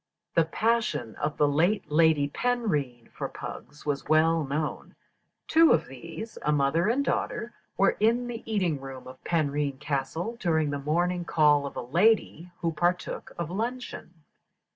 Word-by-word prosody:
The 165 Hz, -, +4 dB
passion 220 Hz, -, 0 dB
of 150 Hz, 0 st, -2 dB
the 150 Hz, -, +4 dB
late 165 Hz, +7 st, +1 dB
Lady 155 Hz, -2 st, +4 dB
Penrhyn 150 Hz, -, -1 dB
for -, -, -5 dB
pugs 150 Hz, +1 st, -9 dB
was 145 Hz, -2 st, -2 dB
well 160 Hz, +1 st, +4 dB
known. 150 Hz, +2 st, -3 dB, 0.5 s
Two 325 Hz, 0 st, +6 dB
of 165 Hz, -, +2 dB
these, 165 Hz, -, -8 dB
a 150 Hz, -, +1 dB
mother 150 Hz, +5 st, +2 dB
and 275 Hz, +4 st, +1 dB
daughter, 235 Hz, -2 st, -2 dB, 0.2 s
were 195 Hz, -, +4 dB
in 235 Hz, +3 st, +3 dB
the 240 Hz, -1 st, -5 dB
eating 175 Hz, -9 st, 0 dB
room 135 Hz, -1 st, -8 dB
of 130 Hz, 0 st, -12 dB
Penrhyn 145 Hz, -4 st, 0 dB
Castle 160 Hz, -, -3 dB
during 160 Hz, -6 st, +1 dB
the 145 Hz, -, -2 dB
morning 175 Hz, +5 st, 0 dB
call 150 Hz, -4 st, +3 dB
of -, -, -9 dB
a -, -, -4 dB
lady, 175 Hz, -, +2 dB
who 165 Hz, -, +1 dB
partook 175 Hz, +3 st, -1 dB
of 170 Hz, -1 st, -3 dB
luncheon. 220 Hz, -6 st, -5 dB
160 Hz, 155 wpm, -27 LUFS, 145-205 Hz, 0.5 s, Two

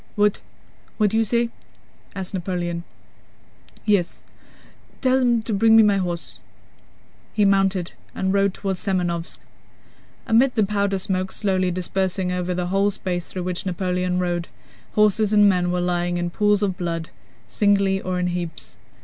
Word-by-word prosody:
"What? 210 Hz, -1 st, +2 dB, 0.6 s
What 210 Hz, -2 st, +2 dB
do 220 Hz, -, +1 dB
you 225 Hz, -, +4 dB
say?" 235 Hz, +2 st, 0 dB, 0.6 s
asked 190 Hz, -1 st, -5 dB
Napoleon. 175 Hz, -2 st, -3 dB, 1.0 s
"Yes, 200 Hz, -5 st, +1 dB, 0.8 s
tell 260 Hz, 0 st, +3 dB
them 240 Hz, -3 st, +2 dB
to 225 Hz, -, -3 dB
bring 220 Hz, +2 st, +5 dB
me 225 Hz, -, +8 dB
my 205 Hz, -2 st, +3 dB
horse." 175 Hz, -3 st, -4 dB, 0.9 s
He 210 Hz, -, +3 dB
mounted 195 Hz, -2 st, +2 dB, 0.2 s
and 190 Hz, 0 st, 0 dB
rode 200 Hz, 0 st, +3 dB
toward 195 Hz, -2 st, -2 dB
Semënovsk. 175 Hz, -3 st, -2 dB, 0.9 s
Amid 245 Hz, +3 st, +3 dB
the 215 Hz, -3 st, +3 dB
powder 200 Hz, -1 st, 0 dB
smoke, 185 Hz, 0 st, -2 dB
slowly 185 Hz, -3 st, 0 dB
dispersing 185 Hz, +1 st, -1 dB
over 180 Hz, 0 st, -2 dB
the 180 Hz, 0 st, -1 dB
whole 200 Hz, +1 st, +3 dB
space 180 Hz, -3 st, -4 dB
through 185 Hz, -, -5 dB
which 180 Hz, 0 st, -3 dB
Napoleon 180 Hz, 0 st, -1 dB
rode, 175 Hz, -1 st, -1 dB, 0.5 s
horses 210 Hz, 0 st, +3 dB
and 205 Hz, -1 st, +6 dB
men 180 Hz, -2 st, +2 dB
were 180 Hz, 0 st, 0 dB
lying 175 Hz, 0 st, 0 dB
in 175 Hz, 0 st, -2 dB
pools 205 Hz, +2 st, +2 dB
of 190 Hz, -3 st, -1 dB
blood, 165 Hz, -2 st, -3 dB, 0.4 s
singly 200 Hz, -2 st, +2 dB
or 185 Hz, 0 st, -2 dB
in 180 Hz, -, 0 dB
heaps. 175 Hz, -2 st, -5 dB
190 Hz, 150 wpm, -22 LUFS, 180-205 Hz, 1.0 s, me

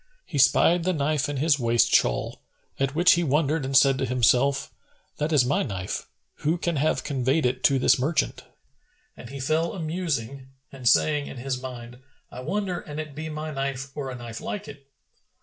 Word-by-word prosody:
He -, -, -4 dB
spied 175 Hz, 0 st, +4 dB
the 185 Hz, +1 st, +1 dB
knife 145 Hz, -2 st, 0 dB
in 145 Hz, -, -3 dB
his 150 Hz, +1 st, +2 dB
waist 120 Hz, -1 st, +2 dB
shawl, -, -, +1 dB, 0.4 s
at 135 Hz, +1 st, -1 dB
which 175 Hz, +3 st, +5 dB
he 175 Hz, -, +3 dB
wondered 150 Hz, +1 st, +1 dB
and 135 Hz, 0 st, +2 dB
said 135 Hz, -1 st, +4 dB
to 135 Hz, -, 0 dB
himself, 130 Hz, +3 st, +2 dB, 0.4 s
"That 150 Hz, +2 st, -1 dB
is 140 Hz, -5 st, +4 dB
my 140 Hz, -, +1 dB
knife: 95 Hz, -7 st, -4 dB, 0.3 s
who 160 Hz, +4 st, 0 dB
can 170 Hz, -2 st, -2 dB
have 155 Hz, +3 st, +1 dB
conveyed 135 Hz, +1 st, 0 dB
it 125 Hz, +1 st, -1 dB
to 140 Hz, -, +4 dB
this 130 Hz, -, +3 dB
merchant?" 150 Hz, +3 st, -1 dB, 0.7 s
And 120 Hz, -, -11 dB
he 140 Hz, +1 st, -7 dB
fell 155 Hz, +5 st, 0 dB
a 195 Hz, -, -6 dB
musing 150 Hz, -6 st, -3 dB, 0.2 s
and 130 Hz, -3 st, 0 dB
saying 150 Hz, -2 st, +2 dB
in -, -, -9 dB
his 125 Hz, 0 st, -3 dB
mind, 120 Hz, -1 st, -8 dB, 0.3 s
"I 125 Hz, -, -8 dB
wonder 185 Hz, +6 st, -2 dB
an 150 Hz, 0 st, -9 dB
it 155 Hz, -2 st, -5 dB
be 155 Hz, +2 st, -6 dB
my 155 Hz, 0 st, -5 dB
knife 135 Hz, 0 st, -3 dB
or 140 Hz, -3 st, -4 dB
a 130 Hz, -, -6 dB
knife 120 Hz, -2 st, -8 dB
like 210 Hz, 0 st, -5 dB
it!" 140 Hz, -1 st, -12 dB
140 Hz, 195 wpm, -25 LUFS, 130-155 Hz, 0.7 s, which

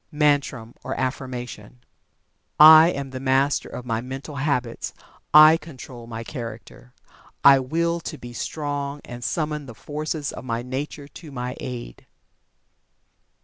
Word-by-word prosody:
MANTRAM 145 Hz, -6 st, +1 dB
(OR -, -, -4 dB
AFFIRMATION). 125 Hz, -3 st, -5 dB, 0.8 s
I 155 Hz, +2 st, +10 dB
am 140 Hz, -5 st, -4 dB
the 130 Hz, -, -5 dB
Master 135 Hz, +2 st, +1 dB
of 125 Hz, -, -8 dB
my 115 Hz, -2 st, -1 dB
Mental 135 Hz, +3 st, -7 dB
Habits 135 Hz, -5 st, -2 dB, 0.4 s
I 155 Hz, +1 st, +9 dB
control 130 Hz, -6 st, -11 dB
my 115 Hz, -1 st, -6 dB
Character. 120 Hz, 0 st, -9 dB, 0.5 s
I 140 Hz, -1 st, +8 dB
Will 170 Hz, +6 st, -1 dB
to 160 Hz, -, -7 dB
be 120 Hz, -2 st, -10 dB
Strong, 145 Hz, +1 st, -4 dB
and 120 Hz, -1 st, -8 dB
summon 150 Hz, -1 st, -2 dB
the 115 Hz, -, -10 dB
forces 150 Hz, +1 st, -4 dB
of -, -, -8 dB
my 120 Hz, -2 st, -3 dB
Nature 140 Hz, +3 st, -5 dB
to 155 Hz, +1 st, -12 dB
my 125 Hz, -1 st, -4 dB
aid. 120 Hz, -, -7 dB
135 Hz, 135 wpm, -23 LUFS, 125-150 Hz, 0.8 s, I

